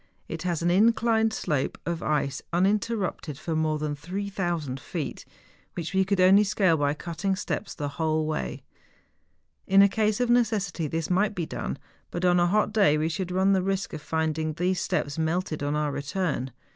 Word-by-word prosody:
It 165 - -5
has 170 -2 -1
an 175 - +3
inclined 225 +2 +3
slope 150 -10 -1
of 170 -1 -2
ice 145 -2 -1
uninterrupted 195 - 0
for 160 +1 -3
more 155 -1 +1
than 150 -1 -2
3000 175 -4 -3
feet, - - -5 0.5
which 170 +1 -4
we 190 0 +4
could 195 0 0
only 190 +3 +7
scale 195 -4 +2
by 145 -1 +1
cutting 175 +5 -2
steps 205 +2 -4
the 145 - -3
whole 155 +2 0
way. 155 0 -3 1.0
In 195 +1 +7
a - - +7
case 215 +1 0
of 245 - +2
necessity 210 -9 +1
this 165 +3 -3
might 205 +3 +2
be 170 - -2
done; 65 - -4 0.3
but 175 +1 -2
on 175 0 +4
a 175 - +4
hot 210 +3 +1
day 195 -9 +4
we 155 +1 0
should 180 +2 -3
run 190 +2 +3
the 190 - +3
risk 195 +1 -2
of 155 - -5
finding 160 0 -1
these 180 +3 0
steps 145 +2 -1
melted 160 0 -1
on 145 +1 -1
our 150 -1 0
return. 145 -2 -2
175 Hz, 185 wpm, -26 LUFS, 155-195 Hz, 1.0 s, only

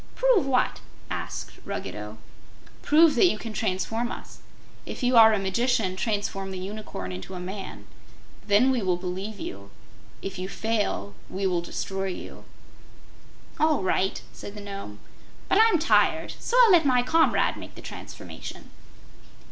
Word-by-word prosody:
"Prove - - +3
what?" 255 -2 +1 0.3
asked - - -5
Ruggedo. - - -6 0.6
"Prove 315 +1 +6
that 275 +8 +5
you 215 - +1
can 225 0 -7
transform 225 +4 -1
us. - - -9 0.4
If - - -7
you 250 0 +3
are 225 -1 +9
a 215 - +2
magician 200 0 +1
transform 200 -2 -2
the 190 - -5
Unicorn 185 - -6
into 95 - -7
a - - -5
man. 190 +2 -7 0.6
Then 215 +6 +5
we 250 -3 +1
will 185 -3 +1
believe 190 +4 -5
you. 100 +1 -7 0.5
If 195 -1 -5
you 185 +1 -4
fail, 210 - -1 0.2
we 195 +1 -3
will 180 -2 +1
destroy 195 +2 -3
you." 185 - -7 1.1
"All 310 -8 +3
right," 190 +1 0
said 205 - -9
the 210 - -7
Nome. 195 - -7 0.5
"But 385 - +3
I'm 445 -4 +6
tired, 325 +2 +2
so 485 - 0
I'll 455 - +6
let 345 -3 +7
my 250 -3 +3
comrade 325 +5 +3
make - - -10
the - - -10
transformation." - - -9
205 Hz, 150 wpm, -26 LUFS, 190-255 Hz, 1.1 s, are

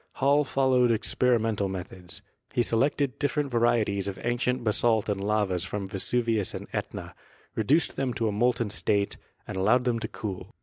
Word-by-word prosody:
Hall 140 +2 +3
followed 130 -3 +3
experimental 115 -2 +1
methods; 90 -1 -6 0.3
he 120 - +3
selected 130 +3 +1
different 145 -1 0
vari 120 -1 +3
eties 100 -1 -2
of 100 - -4
ancient 120 +1 0
basalt 110 0 +2
and 100 -2 -1
lavas 100 -4 +1
from 100 +2 -3
Vesuvius 110 +2 -1
and - - -6
Etna, - - -4 0.4
reduced 140 +10 +2
them 135 -2 0
to 115 -3 0
a - - +1
molten 115 0 +1
state 100 -1 0 0.3
and - - -5
allowed 110 +7 +3
them 120 -2 0
to - - -3
cool. 95 +1 -6
115 Hz, 165 wpm, -27 LUFS, 100-125 Hz, 0.4 s, Hall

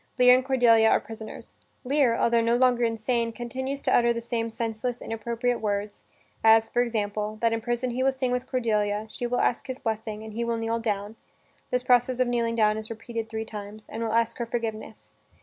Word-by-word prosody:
Lear 250 -1 +7
and 255 +1 +3
Cordelia 240 -4 +4
are - - +4
prisoners. 220 -1 -9 0.3
Lear, 265 -3 +2
altho 235 0 +3
no 230 +1 +2
longer 245 -1 +3
insane, 230 +1 0
continues 260 +4 -5
to - - +3
utter 235 0 +4
the 235 - -1
same 230 -1 -2
senseless, 230 +2 -3
inappropriate 235 +2 -2
words, 205 -1 -3 0.4
as, 225 0 +5
for 245 - +2
example, 215 -2 -2
that 230 -1 +3
in 225 - -1
prison 240 +2 -1
he 250 +2 -2
will 270 +1 +3
sing 260 -1 -2
with 250 +1 -2
Cordelia, 215 -4 0
she 245 - -3
will 245 +1 0
ask 240 - 0
his 260 -1 -4
blessing, 220 -2 -4
and 220 -1 -9
he 235 +2 -2
will 235 0 -1
kneel 225 0 -1
down 210 -1 -3 0.5
(this 250 0 0
process 250 0 +3
of 255 - +3
kneeling 235 -1 0
down 215 -1 +3
is 220 - -7
repeated 230 0 -5
three 220 0 -4
times) 210 0 -9
and 225 - -5
will 225 -1 -1
ask 230 +1 +1
her 235 - -1
forgiveness. 220 -2 -5
230 Hz, 205 wpm, -26 LUFS, 220-245 Hz, 0.5 s, Lear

